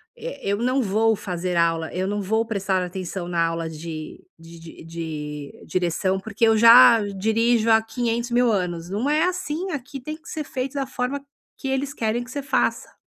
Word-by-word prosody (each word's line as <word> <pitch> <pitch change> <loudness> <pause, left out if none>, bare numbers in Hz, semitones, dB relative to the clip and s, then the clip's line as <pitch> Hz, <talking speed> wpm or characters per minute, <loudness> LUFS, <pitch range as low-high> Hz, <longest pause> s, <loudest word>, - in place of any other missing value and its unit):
eh, - - -7
eu 200 - +1
não 255 +4 +1
vou 220 +2 +2
fazer 180 -2 -3
aula, 165 -1 +1
eu 185 +1 -2
não 205 +1 -2
vou 220 +4 0
prestar 195 -4 -1
atenção 180 0 -5
na 170 -1 +1
aula 165 0 -1
de 160 0 -7
de 165 0 -13
de 150 -3 -6
direção, 185 +2 0
porque 220 +3 0
eu 220 - +5
já 230 +1 +8 0.2
dirijo 225 +2 +2
há 220 0 +6
quinhentos 235 +1 -2
mil 240 0 +3
anos". 175 -4 -2
Não 210 +9 -1
é 305 +2 +3
assim, 365 0 -2
aqui 275 -2 -6
tem 305 +5 -6
que 330 - -14
ser 310 - -4
feito 265 -1 -4
da 275 -1 -1
forma 255 +2 -3 0.4
que 270 - -6
eles 270 +1 -1
querem 230 -1 -1
que 245 - -13
você 280 +1 -5
faça. - - 0
220 Hz, 190 wpm, -23 LUFS, 175-250 Hz, 0.4 s, já